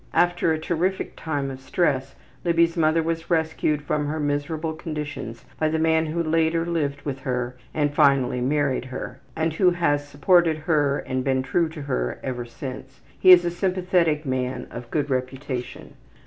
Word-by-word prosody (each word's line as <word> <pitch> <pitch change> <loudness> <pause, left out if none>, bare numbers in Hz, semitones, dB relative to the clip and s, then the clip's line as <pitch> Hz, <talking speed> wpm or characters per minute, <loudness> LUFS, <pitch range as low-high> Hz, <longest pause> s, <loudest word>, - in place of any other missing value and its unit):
After 175 -1 +3
a 160 - +1
terrific 175 +4 -1
time 145 -4 -3
of 130 - -8
stress 135 -2 0 0.3
Libby's 170 -1 +3
mother 160 0 +3
was 165 0 -3
rescued 160 -3 0
from 150 0 -1
her 155 +2 -2
miserable 150 +2 -1
conditions 150 -7 -6
by 155 - +2
the 160 - 0
man 160 0 +2
who 170 +2 -1
later 165 +1 +1
lived 145 -5 -2
with 135 -2 -4
her 125 -1 -2 0.2
and 145 -1 0
finally 135 -4 +3
married 135 -1 +1
her, 130 0 -7 0.2
and 160 0 0
who 180 +3 +4
has 145 -5 0
supported 160 +3 +3
her 150 -3 +1
and 130 0 -3
been 130 -1 +1
true 165 +5 +1
to 155 -2 -8
her 60 - -2
ever 125 -2 -3
since. 130 +2 -8 0.2
He - - +5
is 180 -1 +9
a 175 - 0
sympathetic 180 -4 +1
man 130 -1 -2
of 120 0 -8
good 145 0 -1
reputation. 130 0 -4
150 Hz, 170 wpm, -24 LUFS, 135-165 Hz, 0.3 s, is